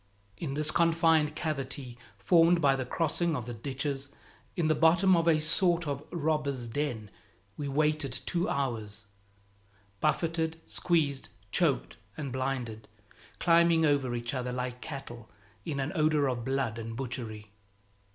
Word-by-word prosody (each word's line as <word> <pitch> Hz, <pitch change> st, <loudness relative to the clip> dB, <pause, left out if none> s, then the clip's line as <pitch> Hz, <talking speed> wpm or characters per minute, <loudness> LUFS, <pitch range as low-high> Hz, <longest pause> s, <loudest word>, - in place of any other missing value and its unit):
In 140 Hz, -4 st, -4 dB
this 155 Hz, +1 st, +2 dB
confined 165 Hz, -2 st, +3 dB
cavity 135 Hz, -5 st, -4 dB, 0.2 s
formed 165 Hz, -, +4 dB
by 140 Hz, -4 st, +4 dB
the 130 Hz, -2 st, -3 dB
crossing 165 Hz, +2 st, 0 dB
of 125 Hz, -5 st, -4 dB
the 120 Hz, -, -5 dB
ditches, 135 Hz, +3 st, -3 dB, 0.5 s
in 165 Hz, -3 st, +1 dB
the 155 Hz, -, +4 dB
bottom 170 Hz, +5 st, +5 dB
of 165 Hz, 0 st, +1 dB
a 160 Hz, -2 st, +5 dB
sort 170 Hz, +2 st, +2 dB
of 140 Hz, 0 st, -3 dB
robbers' 150 Hz, -6 st, -1 dB
den, 115 Hz, -5 st, -3 dB, 0.4 s
we 145 Hz, -, -4 dB
waited 150 Hz, 0 st, +1 dB
two 175 Hz, 0 st, 0 dB
hours, 110 Hz, -6 st, -3 dB, 1.0 s
buffeted, 165 Hz, -, 0 dB
squeezed, 155 Hz, -6 st, 0 dB, 0.2 s
choked 160 Hz, -10 st, +1 dB, 0.2 s
and 140 Hz, -3 st, -4 dB
blinded, 125 Hz, -4 st, -3 dB, 0.5 s
climbing 170 Hz, -1 st, +4 dB
over 140 Hz, -5 st, +1 dB
each 120 Hz, +1 st, -3 dB
other 125 Hz, -1 st, -2 dB
like 125 Hz, 0 st, -4 dB
cattle, 120 Hz, -6 st, -8 dB, 0.4 s
in 140 Hz, -3 st, -3 dB
an 135 Hz, +2 st, -1 dB
odor 155 Hz, -4 st, +2 dB
of 125 Hz, -3 st, -2 dB
blood 130 Hz, -3 st, -1 dB
and 115 Hz, 0 st, -6 dB
butchery. 115 Hz, -4 st, -5 dB
140 Hz, 140 wpm, -30 LUFS, 125-160 Hz, 1.0 s, bottom